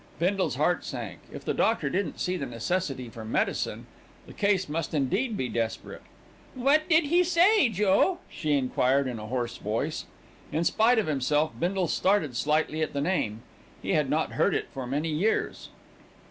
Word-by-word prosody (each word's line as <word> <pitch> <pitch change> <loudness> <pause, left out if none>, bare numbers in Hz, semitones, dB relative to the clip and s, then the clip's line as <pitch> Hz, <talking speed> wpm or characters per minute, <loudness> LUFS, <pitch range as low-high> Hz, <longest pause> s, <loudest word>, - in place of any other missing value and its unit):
Bindle's 185 +4 0
heart - - +1
sank. - - -6
If - - -9
the - - 0
doctor 220 -10 +1
didn't 180 +3 -2
see 180 - -1
the 140 -6 -3
necessity 130 +2 -2
for 115 -1 -9
medicine, 110 - -1 0.4
the - - -12
case 200 -2 +1
must 160 +1 -3
indeed 200 - 0
be 130 - -1
desperate. 115 -2 -3 0.5
"What 280 +5 +2
did 320 0 +5
he 345 +5 +3
say, 355 - +4
Joe?" 210 - +2
she 155 -2 -2
enquired 135 0 +2
in 125 -3 -4
a 105 - -7
hoarse 120 0 -3
voice. 115 +9 -2 0.5
In 160 +3 0
spite 225 +7 +3
of 220 - +2
himself 150 +1 +1
Bindle 180 +1 0
started 165 -8 +1
slightly 155 +4 0
at 155 - -1
the 140 - -1
name. 130 - -1 0.4
He - - -2
had - - +2
not - - 0
heard - - +2
it - - -2
for 130 -2 -5
many 145 +5 -1
years. 170 +9 -1
160 Hz, 175 wpm, -27 LUFS, 130-205 Hz, 0.5 s, did